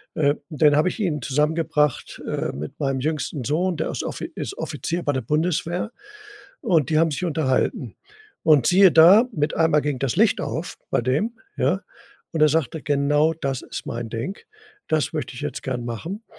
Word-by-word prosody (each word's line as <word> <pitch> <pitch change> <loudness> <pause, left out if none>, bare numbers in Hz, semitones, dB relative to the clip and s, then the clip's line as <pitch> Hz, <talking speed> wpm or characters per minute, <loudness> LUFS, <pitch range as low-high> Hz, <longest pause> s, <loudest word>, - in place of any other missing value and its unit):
Äh, 145 -2 +3 0.2
dann 150 -1 +3
habe 155 +5 +3
ich - - -7
ihn 160 -9 -1
zusammengebracht, 150 0 0
äh, - - -2
mit 75 +3 -7
meinem 135 -3 0
jüngsten 150 -1 -2
Sohn, 170 +7 0
der 160 - -2
ist - - -3
Offi - - -5
ist - - -5
Offizier 170 +1 -3
bei 145 - 0
der 130 - -1
Bundeswehr 170 - -1 0.7
und 170 - +2
die 155 - +3
haben 165 -1 +3
sich 165 - -3
unterhalten. 150 -6 -1 0.5
Und 150 -6 +5
siehe 190 0 +6
da, 180 +9 +8
mit 150 -6 -1
einmal 160 -2 +3
ging 145 -4 -2
das 130 -5 -1
Licht - - +3
auf - - -4
bei - - +2
dem, 150 - -1 0.2
ja? - - +1 0.5
Und 160 - -2
er 155 - +6
sagte, 160 0 -1
genau 145 +2 +2
das 135 -5 -3
ist - - -7
mein 115 -1 -5
Ding. 120 - -4 0.5
Das 155 0 0
möchte 140 -5 -4
ich - - -7
jetzt 145 -1 -4
gern 125 -2 -3
machen. 165 - -5
150 Hz, 185 wpm, -23 LUFS, 135-165 Hz, 0.7 s, da